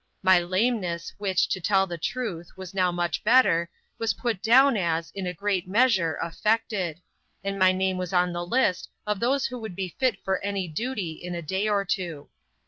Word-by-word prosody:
My 185 -1 +6
lameness, 185 -1 -1
which, 190 -3 +1
to 190 - -2
tell 195 +2 +3
the 175 -2 -5
truth, 180 -5 -3
was 190 0 -8
now 185 -2 +2
much 175 0 -2
better, 210 -8 +4 0.3
was 225 -3 0
put 230 -6 -2
down 260 +4 +6
as, 170 -4 -1
in 195 -2 -4
a - - -1
great 190 0 -1
measure, 190 - +3
affected; 190 -2 -1 0.4
and 195 0 -3
my 185 0 +6
name 190 0 0
was 180 -2 -4
on 180 -1 +2
the 175 0 -3
list 185 -1 +1 0.2
of 210 -2 -1
those 265 +4 +1
who 250 -1 -4
would 220 -5 -7
be 185 -2 -4
fit 255 -6 +2
for 190 0 -1
any 200 -2 -2
duty 200 +1 -3
in 175 +3 -7
a 170 - -5
day 190 +6 -1
or 200 -1 +1
two. 175 -6 -3
190 Hz, 195 wpm, -26 LUFS, 175-215 Hz, 0.4 s, My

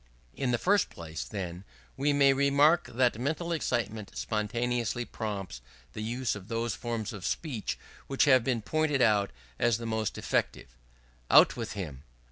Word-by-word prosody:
In 135 - -1
the 120 - +2
first 200 - +2
place, 80 -4 -6
then, 90 +5 -5 0.3
we 140 +2 +1
may 140 -1 +5
remark 140 +5 +4
that 120 -2 +2
mental 160 +6 -2
excitement 115 -9 -2
spontaneously 120 +2 -1
prompts 100 - -5 0.3
the 110 - -5
use 120 +3 -1
of 100 -2 -8
those 115 0 -1
forms 115 -2 -4
of 100 -4 -8
speech 125 - -2 0.3
which 135 - +2
have 130 -4 +5
been 120 -3 -1
pointed 150 +1 +1
out 100 -2 +3 0.3
as 120 -2 +3
the 115 - -7
most 110 -2 -2
effective. - - -1 0.6
"Out - - +7
with 115 -2 -4
him!" 80 -10 -6
115 Hz, 155 wpm, -29 LUFS, 105-135 Hz, 0.6 s, Out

